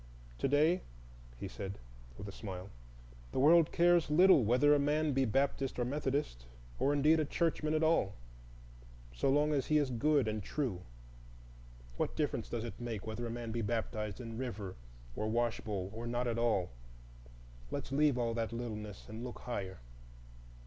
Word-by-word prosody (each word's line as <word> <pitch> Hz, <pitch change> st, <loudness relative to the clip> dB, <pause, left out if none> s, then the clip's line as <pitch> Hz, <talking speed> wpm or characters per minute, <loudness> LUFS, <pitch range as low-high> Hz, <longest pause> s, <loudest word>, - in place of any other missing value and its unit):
"To -, -, +1 dB
day," 155 Hz, +6 st, +3 dB, 0.6 s
he 100 Hz, -, -5 dB
said, 100 Hz, +1 st, -6 dB, 0.4 s
with 100 Hz, -, -7 dB
a -, -, -6 dB
smile, 95 Hz, -2 st, -7 dB, 0.6 s
"the -, -, -3 dB
world 160 Hz, +3 st, +6 dB
cares 175 Hz, -2 st, +4 dB
little 175 Hz, -2 st, +6 dB
whether 125 Hz, +7 st, +4 dB
a 145 Hz, -, +4 dB
man 150 Hz, +1 st, +1 dB
be 135 Hz, 0 st, +2 dB
Baptist 135 Hz, +3 st, 0 dB
or 120 Hz, -, 0 dB
Methodist, 135 Hz, -, -2 dB, 0.3 s
or 140 Hz, -, +3 dB
indeed 150 Hz, +3 st, +4 dB
a -, -, +3 dB
churchman 155 Hz, 0 st, 0 dB
at 155 Hz, -, +1 dB
all, 155 Hz, -12 st, +2 dB, 1.0 s
so -, -, 0 dB
long 150 Hz, +2 st, +3 dB
as 140 Hz, -3 st, 0 dB
he 155 Hz, -, +4 dB
is 145 Hz, -3 st, +1 dB
good 140 Hz, +1 st, +2 dB
and 110 Hz, 0 st, -2 dB
true. 110 Hz, -4 st, -2 dB, 1.2 s
What -, -, -1 dB
difference -, -, -1 dB
does 115 Hz, -2 st, -3 dB
it 120 Hz, -1 st, -7 dB
make 115 Hz, -4 st, -4 dB
whether 110 Hz, +2 st, -4 dB
a -, -, -5 dB
man 115 Hz, -1 st, -4 dB
be 115 Hz, +1 st, -2 dB
baptized 110 Hz, -1 st, -2 dB
in 115 Hz, -1 st, -6 dB
river 105 Hz, -7 st, -5 dB, 0.4 s
or 110 Hz, -, -2 dB
washbowl, 110 Hz, -4 st, -1 dB
or 115 Hz, +2 st, -5 dB
not 120 Hz, +1 st, -1 dB
at 115 Hz, -1 st, -1 dB
all? 110 Hz, -, +1 dB, 1.0 s
Let's -, -, -5 dB
leave 145 Hz, -1 st, +3 dB
all 115 Hz, -1 st, 0 dB
that 115 Hz, -1 st, -2 dB
littleness, 105 Hz, -4 st, -6 dB
and 110 Hz, +2 st, -7 dB
look 125 Hz, -1 st, -7 dB
higher." 95 Hz, -6 st, -5 dB
120 Hz, 170 wpm, -34 LUFS, 110-145 Hz, 1.2 s, world